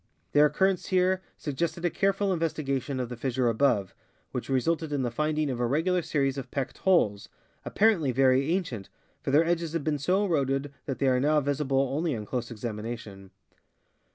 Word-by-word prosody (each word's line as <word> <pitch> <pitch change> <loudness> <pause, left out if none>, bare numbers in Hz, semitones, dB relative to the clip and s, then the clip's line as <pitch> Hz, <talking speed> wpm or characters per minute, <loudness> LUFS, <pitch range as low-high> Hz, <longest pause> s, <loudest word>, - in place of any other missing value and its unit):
Their 150 +1 +6
occurrence 190 +3 +1
here 185 0 +2 0.2
suggested 170 +4 -3
a 175 - +2
careful 195 +1 +1
investigation 140 -5 -2
of 125 - -2
the 125 - -5
fissure 125 0 0
above, 115 -5 +1 0.4
which 125 - -5
re 135 -1 +3
sulted 160 +2 -1
in 140 -2 0
the 120 - -1
finding 150 +2 0
of 125 - -4
a 120 - +1
regular 170 +7 +1
series 140 -4 0
of 130 -1 -8
pecked 135 -1 -4
holes, 105 - +2 0.4
appar. 220 +1 +4
ently 140 -5 0
very 135 +3 +3
ancient, 165 - -2 0.3
for - - -4
their 150 +4 +4
edges 170 -1 -1
had 165 -3 -1
been 150 -1 0
so 185 +8 +2
eroded 140 -4 0
that 135 - -2
they 140 - 0
are 130 -1 +3
now 150 +3 +3
visible 140 -1 0
only 155 -2 0
on 105 -2 -5
close 120 +1 -3
examination. 110 -3 -6
140 Hz, 185 wpm, -28 LUFS, 125-165 Hz, 0.4 s, Their